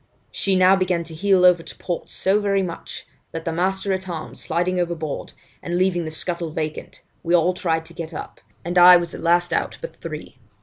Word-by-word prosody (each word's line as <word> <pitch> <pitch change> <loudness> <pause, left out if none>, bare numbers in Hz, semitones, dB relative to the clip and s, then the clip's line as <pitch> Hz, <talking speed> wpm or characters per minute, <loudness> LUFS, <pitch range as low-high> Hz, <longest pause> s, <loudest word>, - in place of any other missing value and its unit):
She 195 -1 0
now 185 +1 +6
began 185 -3 0
to 165 0 -9
heel 185 +2 +3
over 180 -2 +6
to - - -10
port 175 -2 -4
so 195 +2 +1
very 200 -2 +1
much, 170 -2 -7 0.3
that 165 0 -5
the 165 - -1
master 190 +3 0
at 190 0 -4
arms, 160 -2 -6
sliding 180 +2 -1
overboard, 165 -4 -3 0.3
and 175 0 -2
leaving 180 -2 +1
the - - -3
scuttle 170 +1 -3
vacant, 155 0 -5 0.2
we 170 +1 +2
all 175 +2 +3
tried 165 -3 -1
to 170 - -11
get 165 -1 -6
up, - - -8 0.2
and 175 +1 +2
I 180 0 +10
was 170 -1 -3
the - - -7
last 175 +1 +2
out - - -1
but - - -8
three. - - -8
175 Hz, 210 wpm, -22 LUFS, 165-185 Hz, 0.3 s, I